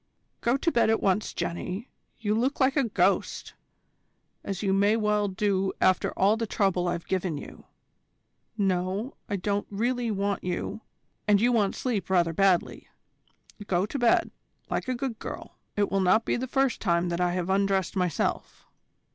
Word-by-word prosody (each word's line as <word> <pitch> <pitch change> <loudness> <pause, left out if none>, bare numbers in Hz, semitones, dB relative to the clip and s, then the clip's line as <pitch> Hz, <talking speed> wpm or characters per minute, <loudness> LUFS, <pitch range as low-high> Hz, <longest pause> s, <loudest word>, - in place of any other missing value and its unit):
"Go 240 +3 +2
to 335 - 0
bed 235 -5 +3
at 225 - +3
once, 195 +2 +1
Jenny; 185 +7 -4 0.3
you 210 -2 0
look 250 +6 0
like 265 0 +3
a 275 -3 +3
ghost, - - 0 0.9
as 195 0 -4
you 195 -1 +2
may 200 +2 +3
well 210 -2 +1
do 195 0 0
after 185 0 +3
all 200 +3 +4
the 225 0 -3
trouble 190 -4 +1
I've 175 -1 -2
given 185 -4 -1
you. - - -10 0.9
No, 195 +4 -1 0.2
I 205 - 0
don't 200 +2 -1
really 240 +3 -1
want 200 -1 -1
you, 180 +4 -3 0.5
and 205 -1 +5
you 240 +4 +3
want 210 -5 +2
sleep 215 -8 -2
rather 175 -3 +2
badly. 190 0 +1 0.8
Go 180 +1 +1
to 275 +6 -4
bed, 240 -1 +3 0.4
like - - -1
a 255 - 0
good 245 -2 -4
girl. - - -8 0.2
It 205 -1 +1
will 195 - +2
not 190 +5 +3
be - - +1
the 255 +2 -3
first 270 -1 +1
time 175 -2 +1
that 170 +1 -2
I 175 0 +1
have 180 0 -1
undressed 195 -1 +1
myself." 180 -4 -2
200 Hz, 170 wpm, -27 LUFS, 185-225 Hz, 0.9 s, and